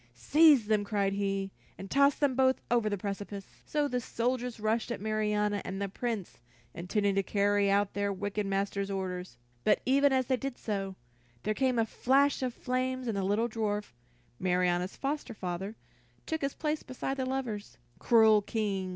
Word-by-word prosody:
"Seize 290 Hz, -, +5 dB
them," 210 Hz, -1 st, +2 dB
cried 200 Hz, -2 st, 0 dB
he, 195 Hz, -1 st, -1 dB, 0.3 s
"and 195 Hz, -, -9 dB
toss 280 Hz, 0 st, +5 dB
them 285 Hz, -3 st, +1 dB
both 260 Hz, 0 st, +3 dB
over 235 Hz, -3 st, +3 dB
the 205 Hz, -, -1 dB
precipice!" 200 Hz, 0 st, -5 dB, 0.2 s
So 295 Hz, -1 st, +1 dB
the 250 Hz, -3 st, -1 dB
soldiers 245 Hz, 0 st, -2 dB
rushed 220 Hz, +2 st, 0 dB
at -, -, -3 dB
Marianna 210 Hz, -1 st, 0 dB
and 190 Hz, +1 st, -5 dB
the 200 Hz, -, -1 dB
Prince, 220 Hz, -2 st, -4 dB, 0.3 s
intending 200 Hz, +4 st, 0 dB
to 195 Hz, -, +2 dB
carry 200 Hz, 0 st, +2 dB
out 200 Hz, 0 st, +2 dB
their 200 Hz, 0 st, 0 dB
wicked 205 Hz, +1 st, -3 dB
master's 195 Hz, 0 st, -1 dB
orders. 185 Hz, -6 st, -4 dB, 0.3 s
But 210 Hz, -, +4 dB
even 280 Hz, +2 st, +4 dB
as 260 Hz, -1 st, +2 dB
they 260 Hz, 0 st, +1 dB
did 270 Hz, -1 st, -4 dB
so, 195 Hz, -3 st, -3 dB, 0.5 s
there 215 Hz, -, 0 dB
came 255 Hz, +1 st, +1 dB
a 225 Hz, -, +3 dB
flash 275 Hz, +6 st, +2 dB
of 255 Hz, -1 st, 0 dB
flame 255 Hz, +1 st, -2 dB
and 225 Hz, -, -1 dB
the 200 Hz, -, 0 dB
little 205 Hz, +5 st, +1 dB
dwarf, 210 Hz, -, -2 dB, 0.5 s
Marianna's 180 Hz, 0 st, +1 dB
foster 275 Hz, -4 st, -3 dB
father, 190 Hz, +3 st, -4 dB, 0.5 s
took 320 Hz, 0 st, -2 dB
his 275 Hz, -1 st, -2 dB
place 305 Hz, 0 st, -1 dB
beside 265 Hz, +1 st, -4 dB
the 260 Hz, -, -1 dB
lovers. 245 Hz, -6 st, -4 dB, 0.2 s
"Cruel 220 Hz, -2 st, +5 dB
King!" 200 Hz, -3 st, -2 dB
215 Hz, 175 wpm, -30 LUFS, 200-255 Hz, 0.5 s, Seize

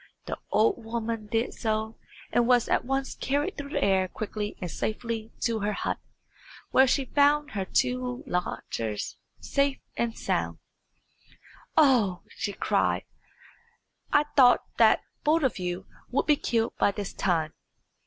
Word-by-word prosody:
The -, -, -4 dB
old 225 Hz, +2 st, +2 dB
woman 225 Hz, -1 st, -3 dB
did 225 Hz, +2 st, 0 dB
so, 220 Hz, -1 st, -2 dB, 0.4 s
and 240 Hz, -1 st, +3 dB
was 245 Hz, -2 st, +4 dB
at -, -, +2 dB
once 270 Hz, +1 st, -1 dB
carried 290 Hz, +8 st, -1 dB
through 285 Hz, -1 st, -6 dB
the -, -, -1 dB
air 190 Hz, -1 st, +3 dB
quickly 210 Hz, +1 st, -5 dB
and 180 Hz, -3 st, -4 dB
safely 225 Hz, 0 st, -3 dB
to 230 Hz, -2 st, +1 dB
her 210 Hz, 0 st, -1 dB
hut, -, -, -2 dB, 0.7 s
where 265 Hz, +1 st, +6 dB
she 270 Hz, +1 st, +2 dB
found 290 Hz, +2 st, +3 dB
her 195 Hz, -2 st, -2 dB
two 250 Hz, +3 st, 0 dB
lodgers 115 Hz, -11 st, -3 dB, 0.2 s
safe 280 Hz, -1 st, +1 dB, 0.2 s
and 235 Hz, -1 st, -1 dB
sound. -, -, -1 dB, 1.2 s
"Oh!" 245 Hz, -, +4 dB
she 205 Hz, -, -4 dB
cried, -, -, +1 dB, 1.1 s
"I 295 Hz, -, +5 dB
thought 250 Hz, -3 st, +6 dB
that -, -, +5 dB, 0.2 s
both 310 Hz, +1 st, +3 dB
of 260 Hz, -7 st, +1 dB
you 180 Hz, +1 st, -3 dB, 0.2 s
would 250 Hz, -, +1 dB
be 300 Hz, -, +5 dB
killed 230 Hz, -4 st, 0 dB
by -, -, +4 dB
this 200 Hz, -1 st, -5 dB
time. 160 Hz, -4 st, 0 dB
230 Hz, 145 wpm, -27 LUFS, 205-265 Hz, 1.2 s, where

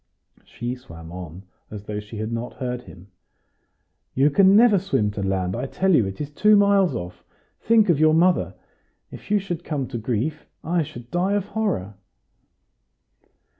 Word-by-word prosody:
She 120 Hz, +1 st, -5 dB
swam 85 Hz, -11 st, -11 dB
on 90 Hz, 0 st, -9 dB, 0.3 s
as 105 Hz, -2 st, -8 dB
though 105 Hz, 0 st, -5 dB
she 105 Hz, +1 st, -9 dB
had 110 Hz, +2 st, -4 dB
not 115 Hz, +1 st, -4 dB
heard 125 Hz, -1 st, -4 dB
him. 95 Hz, -4 st, -15 dB, 1.1 s
"You 140 Hz, +3 st, +3 dB
can 195 Hz, +5 st, +5 dB
never 215 Hz, -3 st, +6 dB
swim 135 Hz, -, 0 dB
to 100 Hz, -, -5 dB
land. 95 Hz, -1 st, -1 dB
I -, -, -3 dB
tell 190 Hz, +6 st, +1 dB
you, 115 Hz, -11 st, +4 dB
it 95 Hz, -, -7 dB
is 150 Hz, -1 st, -5 dB
two 210 Hz, +8 st, +4 dB
miles 200 Hz, -2 st, +3 dB
off. 90 Hz, 0 st, -7 dB, 0.4 s
Think 225 Hz, -1 st, +3 dB
of 170 Hz, -5 st, +2 dB
your 155 Hz, 0 st, +4 dB
mother! 180 Hz, +2 st, +2 dB, 0.6 s
If -, -, -12 dB
you 210 Hz, -, +3 dB
should 175 Hz, -4 st, -4 dB
come 145 Hz, -6 st, -3 dB
to 120 Hz, -3 st, -4 dB
grief, 125 Hz, +7 st, -3 dB, 0.2 s
I 170 Hz, +1 st, 0 dB
should 120 Hz, -5 st, -8 dB
die 180 Hz, +3 st, 0 dB
of 205 Hz, -2 st, 0 dB
horror." 200 Hz, -, -2 dB
135 Hz, 170 wpm, -23 LUFS, -, 1.1 s, never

